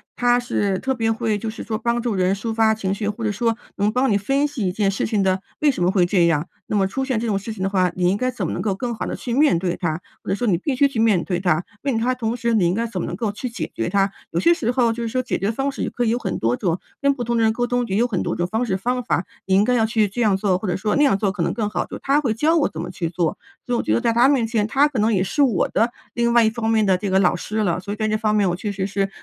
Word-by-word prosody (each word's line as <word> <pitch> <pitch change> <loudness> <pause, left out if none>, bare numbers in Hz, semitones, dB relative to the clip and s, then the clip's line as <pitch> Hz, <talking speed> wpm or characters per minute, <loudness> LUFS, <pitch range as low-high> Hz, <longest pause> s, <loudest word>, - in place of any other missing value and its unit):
他 245 0 +3
是 205 -5 -1
特 265 - -1
别 225 -3 -1
会， 225 -2 0
就 220 +2 -4
是 220 - -7
说 220 -1 -3
帮 235 +1 -1
助 235 -3 -1
人 185 +1 +2
抒 225 +3 -4
发 220 -1 +3
情 195 -3 -2
绪， 205 +1 -3
或 210 +2 -4
者 215 - +1
说 230 +2 0 0.2
能 205 +1 +2
帮 250 +2 +1
你 200 - +3
分 270 +8 +1
析 260 -9 -3
一 - - 0
件 200 0 +1
事 200 - -1
情 210 -3 0
的 190 0 +1 0.2
为 300 -1 +4
什 255 - -6
么 175 - +3
会 185 -2 +3
这 175 -1 +3
样， 165 0 +1 0.2
那 - - -2
么 195 -2 +3
出 265 +8 -2
现 260 -3 -1
这 225 - -2
种 205 -4 0
事 220 +3 -6
情 190 -3 -5
的 195 - +1
话， 185 -2 +2
你 180 -1 +2
应 195 - +1
该 255 +3 0
怎 250 - -3
么 - - -2
能 - - -3
够 200 -3 0
更 240 +4 -3
好 220 - -4
地 - - -3
去 240 - -5
面 285 - +4
对 175 0 -2
它， 165 -1 -2 0.2
或 - - -9
者 195 - +2
说 245 - -2
你 185 -5 +3
必 260 - -2
须 280 +2 +4
去 240 -5 -4
面 215 -6 +3
对 180 -2 -2
它。 175 -2 +1 0.2
并 270 -4 0
且 225 - -1
它 255 +1 +2
同 235 -2 -2
时 235 -1 -1
你 210 -5 +3
应 175 - +1
该 230 +3 -1
怎 195 -5 -5
么 - - -3
能 - - -4
够 215 +2 -2
去 210 +5 -5
解 235 - -5
决 115 - -2
它。 195 +1 +2 0.2
有 165 - 0
些 340 - +5
时 245 -9 -1
候 245 -2 +2
就 230 +1 -4
是 - - -2
说 255 +3 -1
解 255 - -2
决 200 - 0
方 270 +4 -1
式 - - -7
也 - - -1
可 245 - -2
以 230 - +1
有 235 - +1
很 - - -3
多 115 +2 +1
种， 175 -3 0 0.2
跟 280 0 +3
不 250 -3 -4
同 235 0 0
的 230 - +2
人 220 0 +3
沟 245 +2 0
通， 245 0 0
也 195 - -2
有 230 +4 +3
很 200 -7 -2
多 - - -2
种 175 - -1
方 220 +6 -1
式 195 -5 -1
方 245 +6 -1
法， 190 -6 0 0.2
你 190 - 0
应 200 - +5
该 250 +3 +2
要 225 -2 +3
去 220 -1 +2
这 215 +5 -4
样 210 -4 +3
做， 190 -2 +1
或 195 - -5
者 175 - 0
说 210 +2 -1
那 290 - +4
样 270 -9 +4
做 200 -1 0
可 190 -2 -4
能 - - 0
更 215 -3 -1
好， - - -2
就 - - -7
他 275 +2 +2
会 255 -7 0
教 305 +9 +2
我 305 - +3
怎 160 - -6
么 175 - -5
去 175 -2 -3
做。 170 -1 -1 0.3
所 245 - -2
以 - - +1
我 - - -1
觉 - - 0
得 - - +2
在 235 -2 +2
他 235 +3 +5
面 270 -5 +3
前， 220 -2 0
他 275 +6 +3
可 265 -7 -3
能 220 +2 +2
也 185 -2 +2
是 245 +10 -1
我 240 -9 +2
的 230 +3 +1 0.2
另 235 0 +1
外 235 -1 +6
一 220 - +4
方 225 0 -2
面 220 -2 +3
的 190 -1 +3
这 195 +2 -3
个 190 0 +3
老 180 -2 +3
师 215 +5 -5
了， 200 -6 +1
所 200 +2 -5
以 - - -7
在 215 - 0
这 215 0 +1
方 215 -1 0
面 200 -3 +3
我 175 - -1
确 205 +3 -4
实 195 -1 -2
是， 195 0 -1
215 Hz, 375 characters per minute, -21 LUFS, 190-240 Hz, 0.3 s, 外